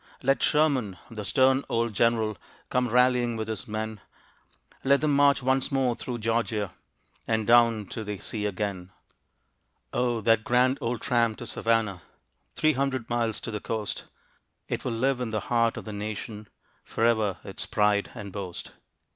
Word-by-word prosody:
Let 135 +2 +2
Sherman, 135 -11 +2
the 110 -2 -5
stern 130 +5 +3
old 115 -1 0
General, 110 -1 +2 0.4
Come 125 0 +2
rallying 125 -1 +3
with 110 0 -3
his 110 -1 -4
men; 110 -1 -4 0.8
Let 140 +1 +4
them 150 -2 +2
march 140 -1 +4
once 130 +1 +1
more 130 -3 +1
through 120 +1 -5
Georgia 115 -4 -1 0.5
And 110 -1 +1
down 115 -2 +5
to 110 - -5
the 105 -1 -4
sea 105 +2 -3
again. 95 -2 -3 1.0
Oh! 120 -2 +1
that 115 0 +3
grand 125 +3 +3
old 115 -1 -2
tramp 115 -4 +1
to 120 - -7
Savannah, 115 -5 0 0.5
Three 155 0 +3
hundred 130 -3 -2
miles 115 -2 0
to 115 - -4
the 105 - -3
coast, 110 0 -4 0.6
It - - -3
will 125 - -2
live 125 +3 0
in 120 - -2
the 110 -1 -1
heart 115 -1 +2
of - - -7
the 110 - -6
nation, 105 +1 -5 0.4
Forever 110 -4 +1
its 95 - -7
pride 105 -1 +2
and 105 -4 -7
boast. 95 -3 -6
115 Hz, 160 wpm, -27 LUFS, 105-125 Hz, 1.0 s, down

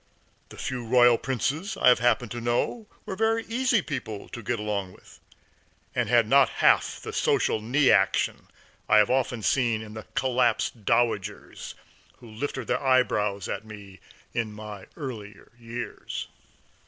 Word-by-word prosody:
The - - -12
few 125 -2 -4
Royal 120 0 +5
Princes 140 - -2
I - - +5
have 125 - +5
happened 120 -1 +1
to 120 - -5
know 120 - -1 0.2
were 190 - -5
very 225 +2 +1
easy 235 -3 +1
people 110 -7 -6
to 120 - -7
get 120 +2 -2
along 100 -3 -3
with, - - -18 0.7
and - - -1
had 120 -2 +4
not 140 +3 +5
half - - +3
the - - -7
social 110 - +1
knee 135 +6 +3
action - - +1 0.4
I - - +6
have 105 +1 +4
often 125 -3 0
seen 115 -4 +1
in 105 -1 -10
the 110 -1 -9
collapsed 120 -4 0
dowagers 115 -5 -1 0.4
who 120 - -14
lifted 130 +2 -4
their - - -1
eyebrows 105 -7 +1
at 100 - -4
me 100 -3 -12 0.3
in 115 -3 -2
my 105 -2 -9
earlier 110 -9 -8
years. 120 +1 -6
120 Hz, 155 wpm, -26 LUFS, 105-130 Hz, 0.7 s, I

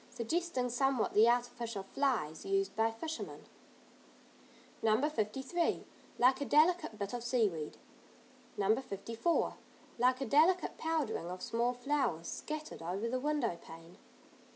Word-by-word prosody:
Suggesting 255 0 -1
somewhat 265 -1 +1
the 215 +2 +6
artificial 240 -3 -1
"flies" 205 - -1
used 390 0 0
by 225 +1 +3
fishermen. 315 +8 -6 1.4
No. 220 0 +3
53. 270 +6 -1 0.3
Like 255 +3 +4
a - - 0
delicate 310 -5 +3
bit 200 +1 -4
of 240 -1 -3
seaweed. 210 -11 0 0.8
No. 205 +2 +3
54. 230 - -1 0.4
Like 255 +1 +3
a 270 - -2
delicate 320 +9 +3
powdering 320 - -1
of 180 0 -6
small 235 +2 0
flowers, 250 - -1
scattered 305 - -5
over 185 +7 -2
the 255 +2 -1
window 285 - 0
pane. 165 +4 -13
245 Hz, 125 wpm, -34 LUFS, 215-295 Hz, 1.4 s, the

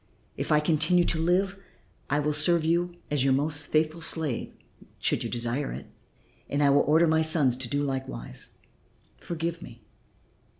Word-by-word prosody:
If - - -4
I 150 - +5
continue 160 +3 +3
to 165 - 0
live 190 +3 +1 0.5
I 145 - +1
will 150 0 0
serve 155 +2 +4
you 175 +2 0 0.2
as 145 -3 +1
your 135 -1 +3
most 145 +2 -2
faithful 155 +1 0
slave 160 -6 -2 0.5
should - - 0
you - - -3
desire 120 +4 -2
it, - - -7 0.6
and 145 +1 0
I 140 - +5
will 145 +1 +5
order 160 +3 +4
my 160 0 +3
sons 155 -6 +2
to 130 -2 -4
do 145 +2 0
likewise. 130 - -5 0.7
Forgive 170 0 -4
me." 115 -2 -12
150 Hz, 165 wpm, -27 LUFS, 140-165 Hz, 0.7 s, I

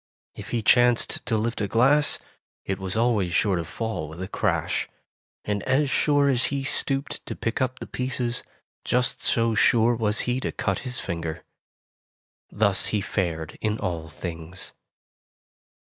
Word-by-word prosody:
If - - -9
he 115 -2 -1
chanced 120 +1 +3
to 115 -3 +2
lift 115 +1 -1
a 100 - 0
glass, 135 +8 +4 0.5
it 95 0 -2
was 95 +2 -3
always 110 -7 +1
sure 105 -6 +3
to 85 - -2
fall 110 -7 -4
with 80 +2 -10
a - - -4
crash; - - -1 0.6
and 105 -1 -1
as 135 +1 +2
sure 145 +1 +3
as 130 -2 +4
he 140 -1 0
stooped 135 0 0
to - - -4
pick 115 +3 -2
up 130 0 0
the - - -7
pieces, 125 -1 -3 0.4
just 125 0 0
so 115 -1 +2
sure 115 +2 +4
was 110 -2 +1
he 125 +1 0
to - - -2
cut - - -1
his 130 -1 -3
finger. 85 -3 -4 1.1
Thus 100 -2 +2
he 105 - 0
fared 85 -5 -3
in 110 0 0
all 85 -5 -3
things. 85 +2 -7
115 Hz, 160 wpm, -25 LUFS, 95-125 Hz, 1.1 s, glass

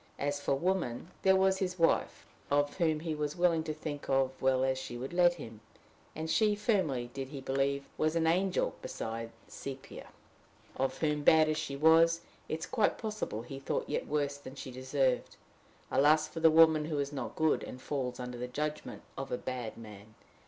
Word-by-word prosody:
As 145 0 -1
for 140 - +1
women 170 -2 -1
there 190 0 +5
was 190 0 +3
his 185 -1 -2
wife 165 -1 +1 0.2
of 145 0 +1
whom 160 -4 +1
he 165 -1 -2
was 150 -1 -2
willing 175 -2 +2
to 155 - -2
think 150 -1 -6
as 135 -1 +3
well 130 0 +2
as 130 0 +1
she 120 -2 -6
would 130 +6 -6
let 175 -1 +5
him! 115 -9 -10 0.5
And 160 0 -4
she, 210 +5 +3
firmly 175 - 0
did 135 -1 -4
he 140 0 -7
believe, 135 +1 0
was 155 +1 +1
an 165 -1 +2
angel 180 +3 +1
beside 115 +1 -5 0.2
Sepia! 135 -1 -8 0.7
of 135 0 -1
whom, 150 -2 0
bad 155 +1 +6
as 155 - 0
she 145 -3 -4
was, 165 +3 +5 0.3
it 155 - -1
is - - -3
quite 225 -5 +1
possible 210 - -4
he 135 +2 -8
thought 135 - -2
yet - - -2
worse 145 -1 -1
than 130 -1 -10
she 135 - -7
deserved: 130 0 0 0.6
alas 155 +2 +4
for 165 - -7
the 160 0 +6
woman 160 -1 +6
who 155 -1 -2
is 140 0 -2
not 130 -4 -5
good, 160 -1 +2
and 125 - -8
falls 130 -2 -3
under 125 -1 -6
the 125 - -3
judgment 150 +4 -4 0.2
of 135 - -5
a 125 - 0
bad 125 -4 -5
man! 110 -1 -12
145 Hz, 195 wpm, -32 LUFS, 130-165 Hz, 0.7 s, bad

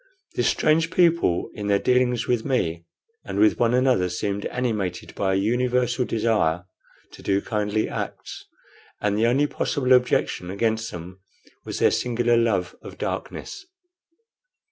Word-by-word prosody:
This - - +1
strange 160 +2 +2
people, 170 - +2
in 105 -1 -5
their 100 -1 +3
dealings 125 +1 +1
with 120 -2 0
me 85 - -1 0.4
and - - -5
with 330 -1 +4
one 120 +1 +3
another, 125 -8 +2
seemed 100 +3 -2
animated 105 -8 -3
by 95 -1 0
a - - +2
universal 125 +3 +1
desire 105 -8 0 0.5
to - - -13
do 100 0 +1
kindly 105 0 -1
acts; - - -6 0.5
and 105 -1 0
the 110 +2 +2
only 135 +5 +3
possible 130 -2 0
objection 125 -7 +1
against 110 +3 -1
them 90 +2 -9 0.5
was - - -5
their - - +4
singular 120 -1 +1
love 110 -6 +1
of - - -11
darkness. 390 - -5
115 Hz, 145 wpm, -24 LUFS, 100-125 Hz, 0.5 s, with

